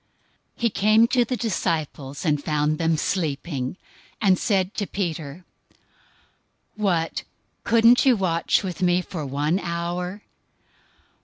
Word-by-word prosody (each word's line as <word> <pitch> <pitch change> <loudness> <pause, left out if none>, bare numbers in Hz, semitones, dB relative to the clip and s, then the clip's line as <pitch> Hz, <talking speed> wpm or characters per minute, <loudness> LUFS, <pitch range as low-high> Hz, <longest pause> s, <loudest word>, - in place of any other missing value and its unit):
026:040 - - -18
He 235 - +3
came 215 +3 +4
to 245 -2 +3
the 250 +2 -2
disciples, 155 - -2
and 150 -2 +1
found 150 0 0
them 165 -1 +2
sleeping, 150 -4 -2 0.4
and 190 -4 +3
said 195 -2 0
to 205 - -3
Peter, 170 -3 -4 1.3
"What, 180 -6 0 0.4
couldn't 230 +1 +5
you 255 -4 +4
watch 175 0 +1
with 185 -1 -5
me 180 0 +2
for 170 -4 -6
one 145 +6 0
hour? 175 +2 -4
175 Hz, 125 wpm, -24 LUFS, 155-205 Hz, 1.3 s, couldn't